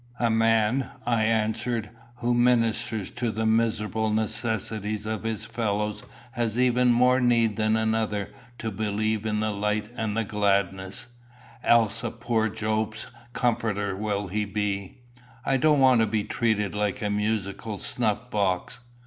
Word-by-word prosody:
"A 120 -2 +1
man," 115 +3 +2 0.2
I 115 -2 +2
answered, 110 0 0 0.2
"who 120 0 0
ministers 115 -3 +1
to 120 -1 -2
the 110 +1 -2
miserable 110 -1 +1
necessities 110 -1 -2
of 110 -1 -3
his 110 -1 -3
fellows 105 -2 -2 0.3
has 120 -1 -1
even 125 0 +3
more 125 +2 +4
need 115 -3 +3
than 110 +1 +2
another 110 -2 0 0.3
to 115 -1 -4
believe 110 +1 -1
in 105 0 0
the 110 0 0
light 105 +1 -1
and 110 -2 -2
the 115 - +2
gladness 100 0 -1 0.5
else 115 -1 +3
a 120 - -1
poor 115 -1 0
Job's 110 0 -2 0.3
comforter 105 -5 0
will 100 0 -2
he 105 +3 -1
be. 100 -2 -3 0.5
I 135 - +2
don't 150 +2 +4
want 130 -3 +6
to 110 - +3
be 105 0 0
treated 105 -4 0
like 105 +1 -1
a 105 - 0
musical 105 0 -2
snuff 115 +3 -2
box." 95 0 -1
110 Hz, 145 wpm, -26 LUFS, 105-115 Hz, 0.5 s, want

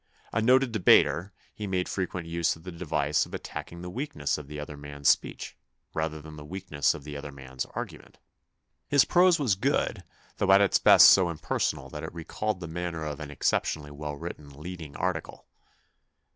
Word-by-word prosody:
A 115 - +1
noted 130 +2 +4
debater, 95 -3 +4 0.2
he 105 - -5
made 90 -2 -1
frequent 90 -3 -3
use 85 0 0
of 80 - -16
the 90 - -7
device 75 -3 0
of - - -7
attacking 85 +1 -7
the 90 - -5
weakness 100 - -2
of 75 - -10
the 75 0 -7
other 75 0 -7
man's 70 0 -5
speech, - - 0 0.4
rather 80 0 -2
than 75 0 -11
the 75 - -9
weakness 80 -3 -1
of 75 - -9
the 75 0 -8
other 70 0 -6
man's 65 -2 -6
argument. - - -7 0.7
His 145 -2 +5
prose 180 -1 +5
was 135 - +2
good, 95 - 0 0.3
though' 95 - +2
at 95 - +8
its 100 -1 +4
best - - +9
so 95 -3 +5
impersonal 75 -3 -2
that 75 - -6
it 80 - -7
recalled 95 +4 -3
the 85 - -5
manner 85 -1 -4
of 75 0 -4
an 75 -2 -6
exceptionally 75 +1 -1
well 75 0 -5
written 70 0 -8
lead 85 +6 -8
ing 70 -2 -9
article. 90 -3 -3
80 Hz, 185 wpm, -28 LUFS, 75-95 Hz, 0.7 s, best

